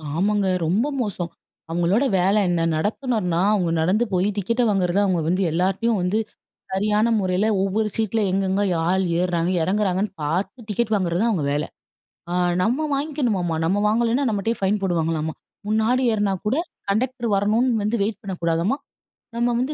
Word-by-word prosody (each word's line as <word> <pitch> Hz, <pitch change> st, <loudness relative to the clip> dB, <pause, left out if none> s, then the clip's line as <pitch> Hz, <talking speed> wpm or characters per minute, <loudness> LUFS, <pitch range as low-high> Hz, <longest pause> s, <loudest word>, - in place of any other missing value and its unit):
ஆமாங்க 200 Hz, +3 st, +1 dB, 0.2 s
ரொம்ப 200 Hz, -, +1 dB
மோசம். 185 Hz, -6 st, -3 dB, 0.4 s
அவங்களோட 175 Hz, +9 st, +1 dB, 0.2 s
வேலை 195 Hz, +4 st, +3 dB
என்ன, 175 Hz, -1 st, +1 dB
நடத்துநர்னா 205 Hz, -, -1 dB
அவங்க 180 Hz, -5 st, +1 dB
நடந்து 195 Hz, +8 st, +2 dB
போய் 185 Hz, +2 st, +2 dB
டிக்கெட்ட 230 Hz, +5 st, 0 dB
வாங்கறத 190 Hz, -2 st, +1 dB
அவங்க 180 Hz, -4 st, +1 dB
வந்து 185 Hz, +3 st, +1 dB
எல்லார்கிட்டயும் 195 Hz, +6 st, +1 dB
வந்து 185 Hz, +5 st, +1 dB, 0.5 s
சரியான 210 Hz, +3 st, +2 dB
முறையில 185 Hz, +1 st, +1 dB, 0.2 s
ஒவ்வொரு 210 Hz, +3 st, 0 dB
சீட்ல 225 Hz, 0 st, 0 dB
எங்கெங்கே 195 Hz, +1 st, +1 dB, 0.2 s
ஆள் 190 Hz, +1 st, +2 dB, 0.2 s
ஏர்றாங்க, 175 Hz, -1 st, 0 dB
இறங்குறாங்கன்னு 195 Hz, +1 st, 0 dB
பார்த்து 190 Hz, -, -2 dB
டிக்கெட் 220 Hz, +1 st, -1 dB
வாங்குறது 175 Hz, -2 st, 0 dB
தான் 230 Hz, 0 st, +2 dB
அவங்க 160 Hz, -8 st, -1 dB
வேலை. 150 Hz, +1 st, -1 dB, 0.6 s
ஆ -, -, -3 dB, 0.3 s
நம்ம 255 Hz, +10 st, +1 dB
வாங்கிக்கணுமாமா. 250 Hz, -, -1 dB
நம்ம 185 Hz, +5 st, +1 dB
வாங்கலனா 235 Hz, +5 st, +1 dB
நம்மட்டயே 220 Hz, +2 st, -1 dB
ஃபைன் 200 Hz, +2 st, +1 dB
போடுவாங்களாம்மா. 160 Hz, -3 st, -1 dB, 0.3 s
முன்னாடி 220 Hz, +4 st, +2 dB
ஏற்னா 205 Hz, -2 st, +1 dB
கூட 245 Hz, +7 st, +1 dB, 0.3 s
கண்டெக்டர் 240 Hz, +3 st, -1 dB
வரணுனு 220 Hz, +4 st, +2 dB
வந்து 210 Hz, +2 st, 0 dB
வெயிட் 205 Hz, 0 st, -2 dB
பண்ணக்கூடாதாம்மா. 175 Hz, +4 st, -1 dB, 0.6 s
நம்ம 240 Hz, +1 st, +1 dB
வந்து 270 Hz, +4 st, -1 dB
200 Hz, 145 wpm, -22 LUFS, 180-225 Hz, 0.6 s, வேலை